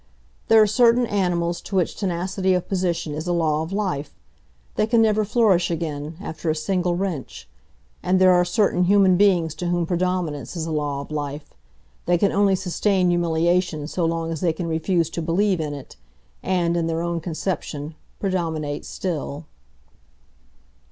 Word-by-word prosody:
There 225 - +6
are 215 - +7
certain 235 +3 +4
animals 175 -5 -1
to 195 - -6
which 180 -3 +1
tenacity 185 0 0
of 180 - -2
position 175 -5 -1
is 155 +3 -5
a 175 - +1
law 155 -3 +1
of 160 +3 -5
life,—they 140 - -5
can 230 0 +3
never 215 -1 +3
flourish 205 -5 +2
again, 155 -2 -4
after 160 -4 -5
a 155 - +1
single 175 +2 0
wrench: 175 - -4 0.5
and 185 +1 +2
there 185 0 +6
are 180 0 +4
certain 180 0 +1
human 195 -1 +5
beings 175 -5 +3
to 175 +2 -4
whom 175 -1 0
predominance 175 -3 -2
is 165 -2 -3
a 165 - -4
law 145 -2 -2
of 140 - -11
life,—they 145 - -5
can 200 +3 +2
only 200 -1 +3
sustain 185 0 +1
humiliation 170 -2 +1
so 175 +2 -2
long 165 0 -1
as 160 - -4
they 170 -3 +2
can 170 +2 -4
refuse 165 +1 0
to 170 - -3
believe 185 +3 +1
in 150 -2 -3
it, 135 - -11 0.4
and, 175 -2 0
in 170 -1 0
their 165 0 -1
own 170 0 -1
conception, 160 -3 -4 0.3
predominate 160 -6 -2
still. 160 -4 -4
175 Hz, 165 wpm, -23 LUFS, 160-190 Hz, 0.5 s, are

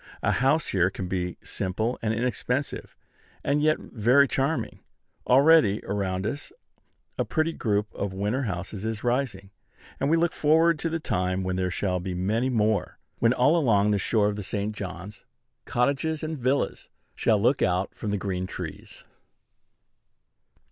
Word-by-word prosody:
A - - +3
house 135 +5 +2
here 90 -1 +2
can 95 -1 -5
be 90 -1 -3
simple 110 +6 -2
and 110 - 0
inexpensive, 125 +3 -2 0.5
and 145 +1 +1
yet 155 0 +3
very 125 +5 +3
charming. 135 -1 -1 0.5
Already, 135 -6 +5
around 95 -1 -2
us 145 +6 -4 0.7
a - - +3
pretty 160 +1 0
group 105 -5 -1
of 100 - -3
winter 105 +7 -1
houses 95 +1 -5
is 110 -1 -3
rising: 120 -6 -1 0.5
and 140 - +1
we 165 - +4
look 170 0 +1
forward 160 +1 +3
to 165 - -1
the 165 0 -2
time 90 - -1
when 95 0 -2
there 90 0 0
shall 90 0 -1
be 90 0 -4
many 110 +8 0
more; 110 -3 0 0.2
when, 115 - +4
all 130 +6 +3
along 105 -10 +3
the 100 - +2
shore 105 +1 +2
of 105 0 -2
the - - -3
St. 105 +2 -3
John's, 95 +1 -7 0.4
cottages 140 +6 0
and 155 0 -3
villas 130 +1 -1 0.2
shall 110 -2 +2
look 125 +6 +2
out 90 +1 +1
from 105 - -5
the 100 - 0
green 95 -2 -3
trees. - - -8
110 Hz, 160 wpm, -26 LUFS, 95-140 Hz, 0.7 s, Already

